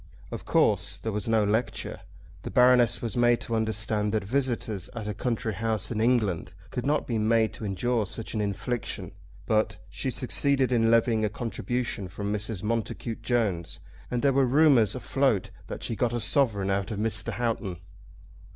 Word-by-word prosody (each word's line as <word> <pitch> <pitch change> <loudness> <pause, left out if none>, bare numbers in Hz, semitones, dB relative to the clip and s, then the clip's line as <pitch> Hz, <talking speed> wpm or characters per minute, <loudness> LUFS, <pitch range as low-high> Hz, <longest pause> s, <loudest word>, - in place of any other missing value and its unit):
Of - - -6
course - - +2
there 110 - -4
was 105 0 -3
no 110 -1 +3
lecture. 110 +2 -1 0.4
The - - -6
Baroness 125 -2 +4
was 115 -4 -3
made 120 0 +4
to 115 - -4
understand 110 -1 0
that 110 - +1
visitors 115 -4 -2
at 110 -3 -5
a 105 - -2
country 115 0 -2
house 110 -1 -1
in 110 -2 -1
England 110 -8 +1 0.2
could 125 +1 -3
not 150 +1 +1
be 115 -3 -1
made 110 0 +2
to 110 - -6
endure 110 +2 0
such 110 +3 -5
an 110 - -1
infliction; 105 +4 -3 0.3
but 110 0 +1
she - - -3
succeeded 135 -2 +1
in 115 -2 +3
levying 115 -1 +3
a 105 - +2
contribution 115 -1 -3
from 100 +3 -4
Mrs. 105 -2 -3
Montacute 115 +1 -2
Jones, 110 -8 -1 0.3
and 125 +1 -2
there 140 -1 +4
were 135 -1 +3
rumours 130 -6 +5
afloat 130 -5 0 0.2
that - - -6
she 115 - -2
got 120 0 0
a 120 - 0
sovereign 105 -5 +2
out 100 +1 -1
of 110 - -4
Mr. 110 +1 -1
Houghton. 115 -6 -2
115 Hz, 175 wpm, -27 LUFS, 105-120 Hz, 0.4 s, rumours